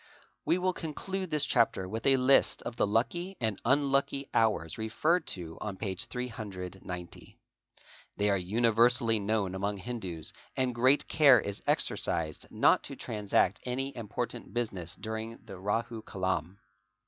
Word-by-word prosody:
We 175 Hz, -, +3 dB
will 185 Hz, 0 st, 0 dB
conclude 185 Hz, +4 st, -4 dB
this 150 Hz, -2 st, +2 dB
chapter 115 Hz, -6 st, +2 dB
with 110 Hz, +6 st, -3 dB
a 135 Hz, -1 st, +6 dB
list 130 Hz, +1 st, +3 dB
of 120 Hz, -, -5 dB
the -, -, +1 dB
lucky 175 Hz, -, -1 dB
and 110 Hz, -4 st, -1 dB
unlucky 140 Hz, +1 st, +1 dB
hours 105 Hz, -6 st, +1 dB
referred 155 Hz, +10 st, +1 dB
to 80 Hz, -2 st, -8 dB
on 100 Hz, -3 st, -4 dB
p.390. 95 Hz, -4 st, -5 dB, 0.8 s
They 105 Hz, 0 st, +2 dB
are -, -, +3 dB
universally 115 Hz, +4 st, +3 dB
known 100 Hz, -2 st, 0 dB
among 100 Hz, +2 st, -2 dB
Hindus 95 Hz, -7 st, -3 dB, 0.2 s
and 130 Hz, -1 st, +1 dB
great 130 Hz, +4 st, +3 dB
care 140 Hz, -6 st, +6 dB
is 100 Hz, -1 st, -3 dB
exercised 80 Hz, -2 st, 0 dB
not -, -, +4 dB
to -, -, -6 dB
transact 105 Hz, -2 st, 0 dB
any 135 Hz, +2 st, -2 dB
important 120 Hz, +2 st, -5 dB
business 95 Hz, -8 st, -3 dB
during 110 Hz, +1 st, -5 dB
the 95 Hz, -, -9 dB
Rahu 115 Hz, +3 st, -2 dB
kalam. 95 Hz, -3 st, -2 dB
115 Hz, 135 wpm, -30 LUFS, 95-130 Hz, 0.8 s, a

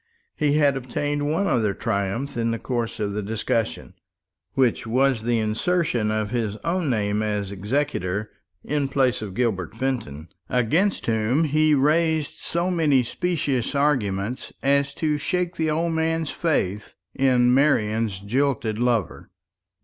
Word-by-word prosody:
He 145 Hz, -1 st, +1 dB
had 145 Hz, -2 st, +3 dB
obtained 145 Hz, +3 st, -2 dB
one 180 Hz, +6 st, +1 dB
other 110 Hz, -, +1 dB
triumph 100 Hz, +9 st, -2 dB
in 115 Hz, -1 st, 0 dB
the 115 Hz, -, -1 dB
course 120 Hz, -1 st, -3 dB
of 100 Hz, -1 st, -1 dB
the 105 Hz, -, -2 dB
discussion, 105 Hz, -2 st, -2 dB, 0.6 s
which 125 Hz, -4 st, +1 dB
was 130 Hz, 0 st, +2 dB
the 120 Hz, +1 st, +1 dB
insertion 115 Hz, +2 st, 0 dB
of 110 Hz, -1 st, -1 dB
his 110 Hz, -4 st, -1 dB
own 170 Hz, -2 st, 0 dB
name 105 Hz, -3 st, 0 dB
as 105 Hz, -2 st, -2 dB
executor 105 Hz, -2 st, -2 dB, 0.3 s
in 145 Hz, -1 st, -1 dB
place 130 Hz, -4 st, +1 dB
of 100 Hz, -4 st, -6 dB
Gilbert 110 Hz, -9 st, -1 dB
Fenton, 110 Hz, -, -3 dB, 0.2 s
against 160 Hz, -, +1 dB
whom 115 Hz, +7 st, +1 dB
he 155 Hz, 0 st, +3 dB
raised 155 Hz, +2 st, +1 dB
so 170 Hz, +2 st, -1 dB
many 150 Hz, -7 st, +3 dB
specious 145 Hz, -3 st, -1 dB
arguments 125 Hz, -6 st, 0 dB
as 140 Hz, 0 st, +2 dB
to 150 Hz, -2 st, 0 dB
shake 180 Hz, +3 st, -1 dB
the 160 Hz, -1 st, 0 dB
old 165 Hz, +2 st, 0 dB
man's 160 Hz, -1 st, 0 dB
faith 105 Hz, -, -1 dB, 0.2 s
in 125 Hz, -2 st, +3 dB
Marian's 110 Hz, -7 st, +2 dB
jilted 115 Hz, -1 st, 0 dB
lover. 120 Hz, -7 st, 0 dB
125 Hz, 140 wpm, -24 LUFS, 110-150 Hz, 0.6 s, had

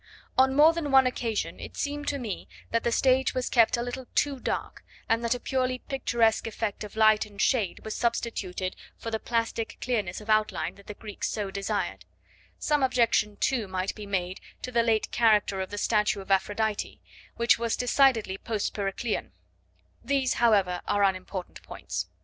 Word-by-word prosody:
On 265 Hz, +1 st, +4 dB
more 310 Hz, +3 st, +7 dB
than 330 Hz, -3 st, -3 dB
one 265 Hz, -1 st, +6 dB
occasion 235 Hz, -4 st, -2 dB
it -, -, -9 dB
seemed 290 Hz, 0 st, -3 dB
to 285 Hz, -, 0 dB
me 230 Hz, -7 st, -5 dB, 0.2 s
that 230 Hz, -, +1 dB
the 235 Hz, -, +1 dB
stage 260 Hz, +2 st, +3 dB
was 255 Hz, -1 st, -1 dB
kept 230 Hz, -1 st, +4 dB
a 235 Hz, -, -1 dB
little 245 Hz, +1 st, -6 dB
too 280 Hz, -2 st, +1 dB
dark, -, -, -4 dB, 0.2 s
and 230 Hz, +1 st, +1 dB
that 235 Hz, +1 st, +1 dB
a -, -, -5 dB
purely 255 Hz, 0 st, -1 dB
picturesque 235 Hz, -5 st, +1 dB
effect 220 Hz, -1 st, -3 dB
of 210 Hz, -, -9 dB
light 215 Hz, -1 st, +4 dB
and 205 Hz, -1 st, -15 dB
shade 215 Hz, -5 st, +1 dB
was 220 Hz, -, -3 dB
substituted 200 Hz, -6 st, -2 dB, 0.2 s
for 230 Hz, -, -6 dB
the 220 Hz, -, -1 dB
plastic 230 Hz, -1 st, -2 dB
clearness 210 Hz, -8 st, -1 dB
of 210 Hz, -, -12 dB
outline 215 Hz, 0 st, +1 dB
that 200 Hz, -, -18 dB
the 210 Hz, -, -7 dB
Greeks 210 Hz, -1 st, -5 dB
so 205 Hz, -2 st, -3 dB
desired; 195 Hz, -, -3 dB, 0.5 s
some 295 Hz, -1 st, +1 dB
objection, 235 Hz, -5 st, +2 dB
too, 240 Hz, -6 st, 0 dB
might 185 Hz, 0 st, -2 dB
be 210 Hz, -2 st, -9 dB
made 185 Hz, -2 st, -2 dB, 0.2 s
to 255 Hz, -, -4 dB
the 235 Hz, -1 st, +3 dB
late 225 Hz, -2 st, +1 dB
character 210 Hz, -4 st, +3 dB
of 190 Hz, -, -4 dB
the 205 Hz, -, -6 dB
statue 210 Hz, -1 st, +1 dB
of 195 Hz, 0 st, -7 dB
Aphrodite, 205 Hz, +2 st, 0 dB, 0.4 s
which 235 Hz, 0 st, +3 dB
was 230 Hz, -1 st, 0 dB
decidedly 245 Hz, -6 st, +3 dB
post 220 Hz, -3 st, -2 dB
Periclean; 200 Hz, -, -3 dB, 0.7 s
these, 270 Hz, -2 st, +1 dB
however, 195 Hz, -6 st, +3 dB
are 205 Hz, -, +2 dB
unimportant 185 Hz, -1 st, -2 dB
points. 90 Hz, 0 st, -5 dB
225 Hz, 180 wpm, -27 LUFS, 200-250 Hz, 0.7 s, more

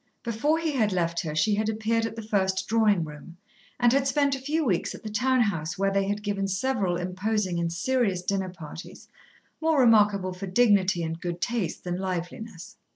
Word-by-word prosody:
Before 235 Hz, +7 st, +1 dB
he 325 Hz, -1 st, -1 dB
had 225 Hz, -7 st, +1 dB
left 170 Hz, -2 st, 0 dB
her 155 Hz, -3 st, -3 dB
she 205 Hz, +7 st, +2 dB
had 215 Hz, +1 st, 0 dB
appeared 225 Hz, +1 st, 0 dB
at 225 Hz, -, -8 dB
the 225 Hz, -, -6 dB
first 190 Hz, -2 st, 0 dB
Drawing 215 Hz, -5 st, +3 dB
room, 155 Hz, +3 st, -10 dB, 0.4 s
and 240 Hz, 0 st, +4 dB
had 275 Hz, 0 st, +2 dB
spent 280 Hz, 0 st, +2 dB
a -, -, -6 dB
few 305 Hz, +3 st, 0 dB
weeks 190 Hz, -8 st, 0 dB
at -, -, -13 dB
the 215 Hz, -, -6 dB
town 255 Hz, +3 st, +2 dB
house, 170 Hz, -7 st, -1 dB
where 195 Hz, +1 st, +1 dB
they 195 Hz, 0 st, +1 dB
had 205 Hz, +1 st, -2 dB
given 200 Hz, -1 st, -1 dB
several 195 Hz, -2 st, 0 dB
imposing 185 Hz, +1 st, -1 dB
and 170 Hz, -1 st, -1 dB
serious 195 Hz, 0 st, 0 dB
dinner 190 Hz, 0 st, -1 dB
parties, 170 Hz, -1 st, -10 dB, 0.5 s
more 320 Hz, -2 st, +2 dB
remarkable 210 Hz, -6 st, +4 dB
for 190 Hz, +2 st, -6 dB
dignity 190 Hz, -4 st, +3 dB
and 165 Hz, +1 st, -4 dB
good 175 Hz, -1 st, -4 dB
taste 225 Hz, -2 st, -2 dB
than 175 Hz, 0 st, -3 dB
liveliness. 185 Hz, +1 st, -5 dB
200 Hz, 195 wpm, -26 LUFS, 180-230 Hz, 0.5 s, and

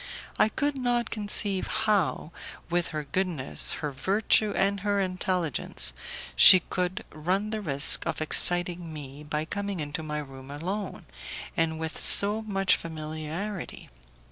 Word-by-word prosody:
I 215 Hz, -, +4 dB
could 290 Hz, +2 st, -2 dB
not 240 Hz, -2 st, -1 dB
conceive 205 Hz, -2 st, +3 dB
how, 200 Hz, -6 st, -1 dB, 0.4 s
with 175 Hz, -1 st, 0 dB
her 155 Hz, -2 st, -5 dB
goodness, 160 Hz, -2 st, +3 dB
her 150 Hz, -, -3 dB
virtue 205 Hz, +7 st, 0 dB
and 200 Hz, +1 st, 0 dB
her 205 Hz, +1 st, -1 dB
intelligence, 185 Hz, -, -3 dB, 0.4 s
she 185 Hz, -, +9 dB
could 180 Hz, +1 st, -4 dB
run 185 Hz, +7 st, -3 dB
the 215 Hz, -1 st, -4 dB
risk 140 Hz, -6 st, +2 dB
of -, -, -3 dB
exciting 175 Hz, +1 st, +2 dB
me 145 Hz, -2 st, -10 dB
by 150 Hz, +1 st, -4 dB
coming 200 Hz, +1 st, -5 dB
into 145 Hz, +1 st, -5 dB
my 150 Hz, -1 st, -5 dB
room 135 Hz, -2 st, -9 dB
alone, 185 Hz, +8 st, -6 dB, 0.5 s
and 160 Hz, -1 st, -1 dB
with 160 Hz, 0 st, -5 dB
so 205 Hz, +2 st, +5 dB
much 195 Hz, -3 st, 0 dB
familiarity. 160 Hz, +4 st, -7 dB
180 Hz, 135 wpm, -26 LUFS, 155-200 Hz, 0.5 s, she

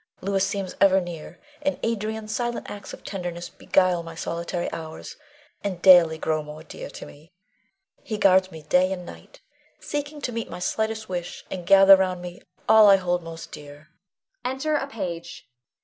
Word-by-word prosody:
Louis 195 Hz, 0 st, 0 dB
seems 195 Hz, -1 st, -3 dB
ever 190 Hz, -1 st, +6 dB
near, 175 Hz, -1 st, -8 dB, 0.2 s
and 285 Hz, -1 st, -1 dB
Adrian's 220 Hz, -1 st, -2 dB
silent 240 Hz, -1 st, -3 dB
acts 205 Hz, -1 st, -8 dB
of -, -, -11 dB
tenderness 175 Hz, -3 st, -5 dB
beguile 185 Hz, -2 st, +1 dB
my 165 Hz, 0 st, -9 dB
solitary 170 Hz, +1 st, -3 dB
hours, 160 Hz, -1 st, -7 dB, 0.5 s
and 190 Hz, -4 st, -3 dB
daily 175 Hz, -4 st, +7 dB
grow 155 Hz, 0 st, -1 dB
more 150 Hz, +1 st, -10 dB
dear 160 Hz, -, -9 dB
to -, -, -9 dB
me. 155 Hz, +4 st, -16 dB, 0.7 s
He 215 Hz, -, -4 dB
guards 190 Hz, -2 st, +4 dB
me 160 Hz, -1 st, -10 dB
day 180 Hz, +5 st, +3 dB
and 180 Hz, -2 st, -4 dB
night, -, -, -13 dB, 0.4 s
seeking 295 Hz, +1 st, -4 dB
to 250 Hz, -, -3 dB
meet 230 Hz, -1 st, -4 dB
my -, -, -7 dB
slightest 220 Hz, +4 st, -2 dB
wish, 175 Hz, -2 st, -5 dB
and 180 Hz, -2 st, -6 dB
gather 195 Hz, 0 st, +9 dB
round 185 Hz, -1 st, 0 dB
me 175 Hz, 0 st, -9 dB, 0.3 s
all 220 Hz, -1 st, +8 dB
I 200 Hz, -, +9 dB
hold 180 Hz, -2 st, 0 dB
most 165 Hz, 0 st, -9 dB
dear. 145 Hz, +2 st, -12 dB, 0.5 s
[Enter 265 Hz, +4 st, -2 dB
a 280 Hz, -2 st, 0 dB
Page. 180 Hz, -10 st, -6 dB
185 Hz, 170 wpm, -24 LUFS, 170-215 Hz, 0.7 s, gather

